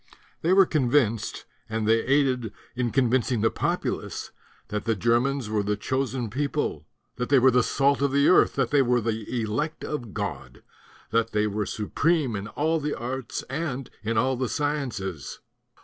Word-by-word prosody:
They 170 - +1
were 190 0 +7
convinced, 125 - +1 0.2
and 110 -1 -1
they 115 +1 +4
aided 130 -5 +1 0.2
in 125 -1 0
convincing 125 -2 +1
the 110 - +3
populace, - - -2 0.4
that 105 -1 -3
the 115 -1 +1
Germans 120 +4 +1
were 105 -1 0
the 105 +1 -1
chosen 130 0 -2
people, 140 +3 -2 0.3
that 125 - -2
they 140 - +6
were 130 +1 +6
the 125 0 +4
salt 140 +3 +2
of 140 -1 +2
the 140 +1 +4
earth, - - +5
that - - 0
they 145 -1 +5
were 125 -1 +3
the 115 +1 -2
elect 145 +9 -2
of 120 -9 -5
God, - - -5 0.5
that 115 0 +1
they 105 0 +2
were 105 -1 -2
supreme 140 - 0
in 100 +1 -4
all 160 +8 0
the 150 0 -2
arts 125 +1 -4
and 135 -2 -4
in 110 +1 -1
all 130 +3 +2
the 125 -1 -2
sciences. 120 - -3
125 Hz, 170 wpm, -26 LUFS, 110-140 Hz, 0.5 s, were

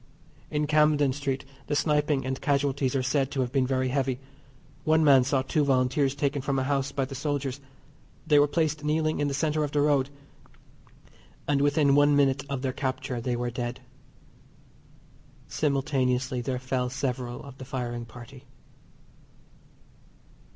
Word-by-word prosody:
In 150 0 0
Camden 150 -2 +3
Street 135 -1 -3 0.2
the 145 - 0
sniping 150 -3 +1
and 130 0 -3
casualties 140 -2 0
are 130 - +1
said 135 +1 +1
to 135 - -2
have 125 -1 -2
been 130 -1 +1
very 130 -1 0
heavy. 130 -1 -1 0.6
One 160 0 +3
man 135 -4 +6
saw 135 0 +1
two 150 +3 +1
Volunteers 135 +1 +2
taken 140 0 -1
from 135 +1 -1
a 130 - +1
house 135 0 0
by 135 - -1
the 135 - -9
soldiers. 140 -1 -3 0.6
They 150 -2 +5
were 145 - +5
placed 155 -1 -1
kneeling 155 +1 0
in 145 - +1
the 140 - -2
centre 155 +1 0
of 145 - -4
the 145 - +2
road, 145 -2 +2 1.4
and 140 -1 +2
within 145 0 +3
one 145 0 +5
minute 135 -1 +2
of 135 -1 -3
their 130 -1 -1
capture 130 -2 -3
they 125 +1 -1
were 120 0 -2
dead. 120 0 -4 1.7
Simultaneously 130 -3 0
there 130 +1 -2
fell 125 0 -2
several 125 -2 -3
of 135 -1 -12
the 130 - -7
firing 120 -3 -4
party. 125 +3 -13
135 Hz, 160 wpm, -27 LUFS, 130-145 Hz, 1.7 s, man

